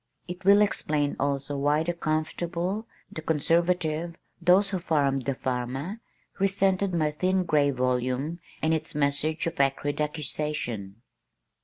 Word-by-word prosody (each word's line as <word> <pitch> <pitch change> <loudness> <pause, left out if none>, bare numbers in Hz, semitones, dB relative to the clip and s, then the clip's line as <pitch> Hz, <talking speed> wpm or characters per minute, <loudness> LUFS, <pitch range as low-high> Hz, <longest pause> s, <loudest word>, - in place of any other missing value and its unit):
It 180 +1 -7
will 200 +2 +7
explain 150 -7 0
also 140 0 -1
why 145 +3 +2
the 175 +1 -1
comfortable, 170 +5 -2 0.2
the 160 - -6
conservative, 165 +1 +1 0.3
those 185 +3 +4
who 190 - -1
farmed 140 -6 +1
the 135 - 0
farmer, 130 - -3 0.4
resented 195 0 +2
my 155 -3 +1
thin 185 +4 +1
gray 150 -4 +3
volume 130 +4 -1 0.2
and 160 +1 +3
its 160 -1 -2
message 150 +2 0
of 165 -2 -4
acrid 140 +2 +1
accusation. 140 -8 -3
155 Hz, 130 wpm, -27 LUFS, 140-175 Hz, 0.4 s, will